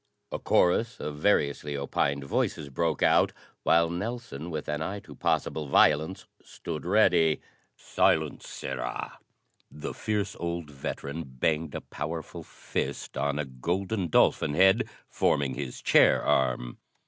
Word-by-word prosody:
A - - -3
chorus 115 +7 +2
of 75 -1 -5
variously 75 -5 +1
opined 70 0 -1
voices 70 +1 -1
broke 80 +2 0
out, - - +4 0.3
while 85 0 +4
Nelson 90 - -5
with 80 -3 -4
an 75 +1 -2
eye 100 +5 -3
to - - -12
possible 75 -2 -1
violence 75 +5 +3 0.2
stood 80 0 -7
ready. 90 -6 +4 0.4
"Silence! - - +1
Sirrah!" - - -5 0.5
The 75 - -6
fierce 105 -2 -2
old 85 -3 -4
veteran 70 +2 -5
banged 75 +3 -1
a - - -3
powerful 80 +2 -6
fist - - -5
on 70 0 0
a 75 - -1
golden 90 - -2
dolphin 75 -1 +3
head 95 +4 +4 0.2
forming 70 -2 +1
his 70 -4 -6
chair - - +5
arm. 60 -2 0
80 Hz, 130 wpm, -28 LUFS, 70-90 Hz, 0.5 s, chair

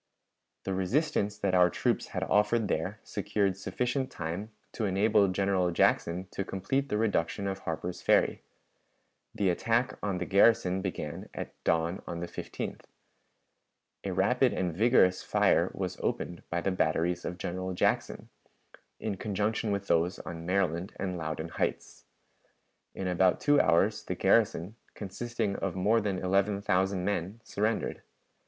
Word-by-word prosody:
The 95 - -2
resistance 105 - 0
that 100 -2 -1
our 90 -1 +6
troops - - 0
had - - -3
offered 105 +1 +2
there 95 +5 -2
secured 100 -2 -1
sufficient 125 +7 -2
time 85 +6 -5 0.2
to 110 - -2
enable 100 +1 +3
General 95 -1 +1
Jackson 85 +1 +2
to 100 - -3
complete 115 +10 -2
the 105 - 0
reduction 100 -3 0
of 95 0 -2
Harper's 85 +2 -4
Ferry. - - +3 0.9
The 95 -3 +2
attack 115 +7 0
on 100 -3 -1
the 90 - -2
garrison 95 -2 +4
began 90 -6 -5
at - - -5
dawn 85 +2 +1
on 85 - -4
the 85 - -4
15th. 85 - -6 1.2
A - - -2
rapid - - +2
and 90 -3 -1
vigorous 100 -3 +4
fire - - +3
was - - -4
opened 85 -1 -2
by 85 0 -1
the 95 - 0
batteries 85 0 0
of 90 - -4
General 95 +1 -4
Jackson, - - 0 0.7
in 105 -3 -3
conjunction 105 +3 -1
with 100 0 -1
those 85 +1 +1
on 85 -1 -7
Maryland 90 -1 0
and 95 -2 -3
Loudon 80 -1 -4
Heights. - - -3 0.9
In 95 - -3
about 90 0 +3
two 145 0 +4
hours, 95 +6 +2
the 90 - -3
garrison, 105 0 +2 0.2
consisting 105 0 -3
of 95 -2 -3
more 105 +5 +3
than 100 -3 -1
eleven 100 +2 +1
thousand 95 -1 +1
men, 100 +2 -2
surrendered. 110 +1 -1
95 Hz, 145 wpm, -30 LUFS, 90-105 Hz, 1.2 s, our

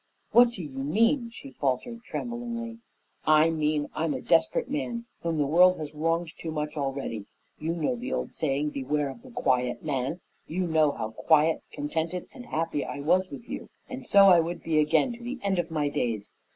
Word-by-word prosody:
"What 240 0 +7
do 190 - -6
you 150 - -7
mean?" 220 - +1
she 270 +4 -11
faltered 150 - -2
tremblingly. 235 -1 -5 0.5
"I 155 +1 +5
mean 150 -2 0
I'm 160 -1 -1
a - - -4
desperate - - +2
man 240 -5 -3 0.2
whom 165 -1 -1
the 145 - +2
world 180 +5 +5
has 155 -1 -6
wronged 165 +2 -1
too 165 - -5
much 150 -1 -3
already. 135 -7 -3 0.3
You 160 +2 -1
know 170 +9 0
the 250 +2 -5
old - - -2
saying, 150 0 0
'Beware 140 +1 -1
of 135 - -9
the 260 - -13
quiet 125 - 0
man!' 145 +4 -2 0.3
You 180 +3 -1
know 155 -3 +3
how 110 - -4
quiet, 155 +6 +3
contented, 160 +4 -3
and 245 -1 -10
happy 160 -2 -1
I 145 - -5
was 185 +6 +2
with 235 - -9
you, - - -6 0.2
and 260 0 -7
so 200 -5 +6
I 175 -2 +8
would 170 +1 -2
be 160 -2 +2
again 155 - +3
to 235 0 -11
the 250 +3 -4
end 195 -2 +1
of 170 -1 -1
my 155 -3 0
days. 115 -7 -2
160 Hz, 195 wpm, -27 LUFS, 145-230 Hz, 0.5 s, I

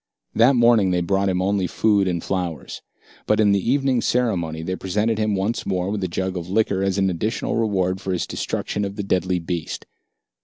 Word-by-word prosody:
That 125 +4 +5
morning 115 -5 +4
they 90 -1 +1
brought 95 +3 +1
him 90 0 0
only 95 -1 +1
food 100 0 +2
and 85 -2 -1
flowers. 90 -7 -4 0.5
But 105 - +2
at 105 -2 +4
the 100 - +3
evening 135 -3 +2
ceremony 85 -10 0
they 95 +3 -2
presented 105 +4 -1
him 105 -1 +1
once 100 +5 -1
more 95 0 -1
with 105 -2 -2
a - - 0
jug 95 +2 -3
of 90 -1 -5
liquor 100 -1 +1
as 95 0 0
an 95 -1 +2
additional 105 +7 -2
reward 95 -4 0
for 95 - -3
his 90 -2 -1
destruction 105 - -3
of 100 0 -4
the 100 - -3
deadly 95 -1 0
beast. 85 -1 -4
95 Hz, 200 wpm, -22 LUFS, 90-105 Hz, 0.5 s, That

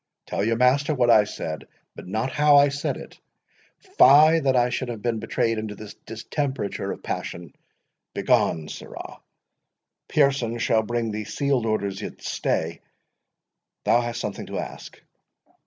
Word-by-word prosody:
Tell 100 - -2
your 115 +2 +1
master 140 +5 +3
what 120 -2 +3
I 105 -2 +6
said—but 80 -4 -8
not 110 +7 -2
how 150 0 +5
I 140 0 +6
said 140 +1 -3
it—Fie, 160 - +2
that 135 -3 +1
I 120 0 +3
should 130 - -2
have 110 -3 -6
been 115 -2 0
betrayed 115 0 -1
into 110 -1 -5
this 105 0 -10
distemperature 120 0 -3
of - - -8
passion!— 85 -1 -5 0.6
begone, 80 -2 +1
sirrah. - - -9 0.9
Pearson 135 -5 +1
shall 115 -1 +2
bring 115 0 -2
thee 105 0 -4
sealed 135 -3 0
orders—Yet, 100 -3 -3
stay—thou 85 +7 -4
hast 120 0 -4
something 105 -4 -5
to - - -5
ask." - - -7
120 Hz, 135 wpm, -24 LUFS, 110-140 Hz, 0.9 s, I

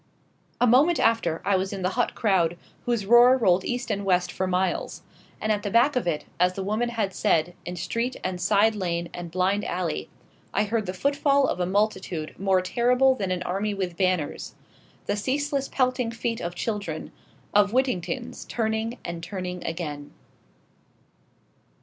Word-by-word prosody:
A - - +4
moment 280 +8 +4
after 200 -8 +1
I 200 - +3
was 190 +1 -1
in 195 -2 -5
the 185 - +2
hot 245 +2 0
crowd, 175 -6 +2 0.3
whose 235 -4 0
roar 240 +4 +7
rolled 185 -6 +3
east 245 -1 -2
and 200 -1 -1
west 180 -2 +1
for 190 - -2
miles. 185 0 -1 0.4
And 215 - 0
at 205 -1 +1
the 205 - -3
back 240 +7 +4
of 250 -8 0
it, 155 -3 -1
as 180 +1 +3
the 195 - -4
woman 215 +5 0
had 215 -5 -2
said, 165 0 +1
in 175 - -5
street 235 +8 -2
and 185 -1 -3
side 205 +4 +4
lane 170 -4 -2
and 175 -1 -6
blind 185 +4 +1
alley, 175 -5 -3 0.5
I 205 - +3
heard 215 -1 -1
the 185 - -3
footfall 280 +4 +2
of 180 - -1
a 180 - 0
multitude 190 -5 -1
more 190 -1 +2
terrible 250 +6 +3
than 200 -7 -3
an 180 -1 -1
army 200 +3 -2
with 185 -3 -3
banners, 185 -5 -1 0.5
the - - 0
ceaseless 275 +5 -1
pelting 255 -2 0
feet 230 0 -3
of 170 +1 -4
children 210 -3 -4 0.4
of 205 0 +5
Whittingtons 250 -1 -1
turning 225 +1 -1
and 170 -1 -5
turning 180 0 -5
again. 150 -4 -5
200 Hz, 170 wpm, -25 LUFS, 180-235 Hz, 0.5 s, roar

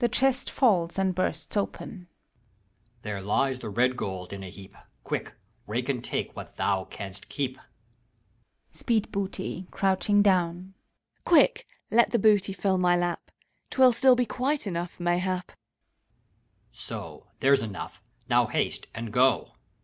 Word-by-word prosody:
(The 240 - +3
chest 270 +2 +2
falls 185 -10 +2
and 190 -1 +1
bursts 185 +4 -2
open,) 205 - -2 0.3
HAVEQUICK. 105 +1 -40
There 100 -2 -4
lies 130 +6 +1
the 110 - -6
red 125 +4 +2
gold 95 -4 -5
in 100 - -6
a 95 - -7
heap! 95 +1 -13 0.3
Quick, - - -4 0.3
rake - - -2
and - - -1
take - - -3
what - - -9
thou 95 -2 0
canst 95 -1 -8
keep! 130 -2 -3 1.1
SPEEDBOOTT 195 -4 -2
{cfouching 200 +1 +2
down). 180 -1 +1 0.5
Quick, 345 +9 +4 0.2
let 235 +1 +5
the 235 - +2
booty 205 -2 +4
fill 190 0 0
my 180 -1 +4
lap! 175 0 -2 0.4
'T - - -8
will 260 -1 +8
still 255 +2 +5
be 250 0 +1
quite 265 +6 -1
enough, 175 -2 -4
mayhap. 180 +1 -1
HAVEQUICK. - - -26 1.1
So! - - -8
there's 135 -1 +4
enough! 105 -4 -6 0.3
Now - - +3
haste, - - -2
and 115 -1 -5
go 130 +1 +3
175 Hz, 145 wpm, -27 LUFS, -, 1.1 s, will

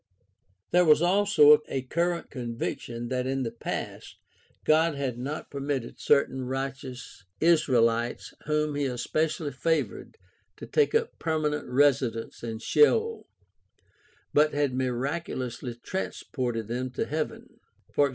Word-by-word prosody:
There 180 0 +5
was 155 0 +5
also 175 -6 +6
a 135 -1 -3
current 170 +5 -1
conviction 120 -1 -4
that 125 0 -1
in 135 0 -1
the 115 - -3
past 115 - -6 0.5
God 160 0 +4
had 130 -4 -3
not 140 +5 -5
permitted 140 -3 -3
certain 130 -2 +2
righteous 135 -3 -5 0.2
Israehtes 120 -8 +2
whom 150 0 +1
he 145 0 -1
especially 150 +4 -1
favored 160 +5 -2 0.4
to - - -8
take 450 -1 +2
up 460 +1 0
permanent 155 -2 -1
residence 130 -4 +1
in 115 -1 -4
Sheol, 445 - +2 1.1
but 150 0 +4
had 145 -3 +1
miraculously 130 -1 -3
transported 120 - -4
them 125 +2 -3
to - - -1
heaven 155 0 -5 0.4
(e.g. 145 -1 +4
140 Hz, 120 wpm, -27 LUFS, 125-155 Hz, 1.1 s, also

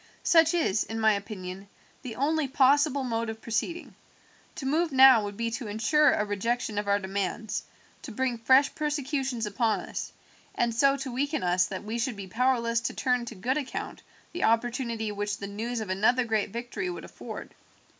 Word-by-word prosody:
"Such 330 -2 +5
is, 225 - +1
in 225 0 -5
my 220 -1 +4
opinion, 195 -2 -6 0.3
the 235 -4 -7
only 300 +3 +1
possible 280 +1 +3
mode 230 -2 -2
of 220 0 -6
proceeding. 335 +11 -3 0.6
To 270 - -6
move 315 +4 +1
now 260 -4 +7
would 205 -1 -6
be 230 0 -1
to 230 0 -4
ensure 265 +8 +3
a 210 - 0
rejection 210 +1 -1
of 205 - -4
our 200 0 +3
demands, 200 +2 -3 0.4
to 260 - -8
bring 245 +1 -1
fresh 265 +4 +4
persecutions 275 -5 -2
upon 220 +2 0
us, - - -6 0.4
and 235 -1 +1
so 275 +4 +3
to 270 -1 -5
weaken 280 +3 -1
us 180 +1 +2
that 190 0 -6
we 220 +3 -4
should 235 0 -1
be 200 -1 -7
powerless 235 +2 +1
to - - -3
turn 250 -2 0
to 230 - -8
good 255 +9 -1
account 270 -3 -6 0.3
the 350 - -3
opportunity 230 -1 0
which 205 0 -3
the 200 - -6
news 225 +4 -4
of 215 - -6
another 240 +6 +2
great 220 -3 0
victory 245 - -4
would 355 - -6
afford. - - -9
235 Hz, 185 wpm, -28 LUFS, 210-270 Hz, 0.6 s, now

